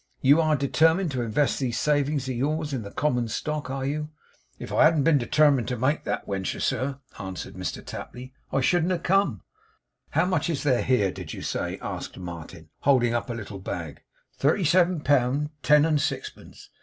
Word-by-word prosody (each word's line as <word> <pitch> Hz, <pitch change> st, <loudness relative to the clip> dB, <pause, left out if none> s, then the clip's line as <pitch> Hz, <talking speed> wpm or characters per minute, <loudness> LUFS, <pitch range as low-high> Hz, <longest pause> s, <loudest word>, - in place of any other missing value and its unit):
You 145 Hz, +5 st, +6 dB
are 155 Hz, -1 st, +2 dB
determined 160 Hz, +5 st, +2 dB
to 130 Hz, -2 st, -2 dB
invest 120 Hz, +5 st, 0 dB
these 125 Hz, -4 st, -1 dB
savings 145 Hz, -2 st, +1 dB
of 130 Hz, -, -2 dB
yours 150 Hz, +4 st, -1 dB
in 130 Hz, -, -2 dB
the 100 Hz, -, -7 dB
common 125 Hz, -2 st, 0 dB
stock, 150 Hz, +4 st, -3 dB
are 135 Hz, 0 st, -3 dB
you?' 150 Hz, +2 st, -2 dB, 0.5 s
'If -, -, -7 dB
I -, -, +5 dB
hadn't 155 Hz, -3 st, +4 dB
been 155 Hz, -1 st, +4 dB
determined 140 Hz, 0 st, +3 dB
to 125 Hz, -1 st, -2 dB
make 135 Hz, +6 st, 0 dB
that -, -, -3 dB
wentur, 95 Hz, -1 st, -3 dB
sir,' 135 Hz, +1 st, -1 dB, 0.2 s
answered 95 Hz, -4 st, -6 dB
Mr -, -, -5 dB
Tapley, 130 Hz, +1 st, -8 dB, 0.2 s
'I 135 Hz, -, +1 dB
shouldn't 175 Hz, +5 st, +2 dB
have 170 Hz, -, -3 dB
come.' 180 Hz, -, +1 dB, 0.7 s
'How 165 Hz, +4 st, +2 dB
much 180 Hz, -3 st, 0 dB
is 160 Hz, -3 st, -2 dB
there 130 Hz, -5 st, +2 dB
here, 110 Hz, -7 st, +2 dB
did -, -, -8 dB
you -, -, -7 dB
say' -, -, -3 dB
asked -, -, -5 dB
Martin, 85 Hz, -3 st, -9 dB
holding 125 Hz, -4 st, +3 dB
up 120 Hz, +1 st, -2 dB
a -, -, -2 dB
little 105 Hz, -3 st, -7 dB
bag. 85 Hz, -5 st, -6 dB, 0.4 s
'Thirty 160 Hz, +7 st, +2 dB
seven 175 Hz, +1 st, +3 dB
pound 145 Hz, +1 st, +1 dB
ten 150 Hz, 0 st, +5 dB
and 155 Hz, -3 st, +2 dB
sixpence. -, -, -5 dB
140 Hz, 190 wpm, -26 LUFS, 120-155 Hz, 0.7 s, You